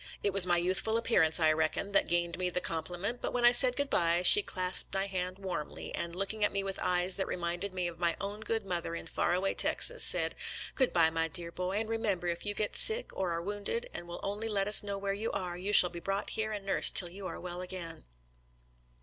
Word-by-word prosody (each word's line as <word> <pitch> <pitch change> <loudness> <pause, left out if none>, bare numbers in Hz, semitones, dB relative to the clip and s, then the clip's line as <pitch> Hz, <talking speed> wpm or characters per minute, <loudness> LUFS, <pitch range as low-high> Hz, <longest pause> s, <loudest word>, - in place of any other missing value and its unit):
It 200 - -1
was 190 -2 +8
my 175 -1 +1
youthful 190 +6 0
appearance, 180 -9 +1
I 160 -1 +3
reckon, 160 +5 -2
that 200 - +1
gained 170 +1 -2
me 180 -1 -2
the 180 - -3
com 165 -2 -3
pliment, 195 +7 -6
but - - -5
when 245 -1 0
I 240 - +7
said 250 0 +7
good 285 0 -3
by, 170 +1 +1
she 415 - +9
clasped 185 - 0
my 195 0 -1
hand 185 -1 -5
warmly, 185 -6 -7
and, 170 0 -6
looking 195 +3 -4
at 205 - +1
me 195 0 -3
with 195 -1 -6
eyes 180 +1 0
that 190 - -3
reminded 175 +3 -5
me 185 -1 -4
of 170 -1 -10
my 170 -1 -1
own 205 +1 -6
good 220 -1 -4
mother 170 -2 -5
in - - -8
far - - -2
away 190 +2 -2
Texas, - - +2
said, - - +2 0.2
" - - -8
Good 260 -3 0
by, 165 -2 +2
my 165 0 -2
dear 170 -1 -2
boy, 180 +2 -5
and 215 +2 -3
remember 220 -5 -3
if 170 +3 -4
you 205 - -3
get 210 0 -3
sick 450 +2 +4
or 185 -2 -3
are 170 0 -4
wounded, 205 - -5
and 175 - -8
will 175 - -9
only 210 +3 -4
let 200 -2 -1
us 210 - +6
know 200 -1 -6
where 195 0 -4
you 215 +3 -4
are, 180 -2 -5
you 185 +3 -5
shall 180 -3 +10
be 170 - -9
brought 195 +3 -4
here 220 0 -4
and 205 -2 -7
nursed 195 - +5
until 175 -2 -4
you 195 0 -8
are - - -8
well 180 0 -8
again." 180 -3 -8
185 Hz, 250 wpm, -29 LUFS, 175-205 Hz, 0.2 s, shall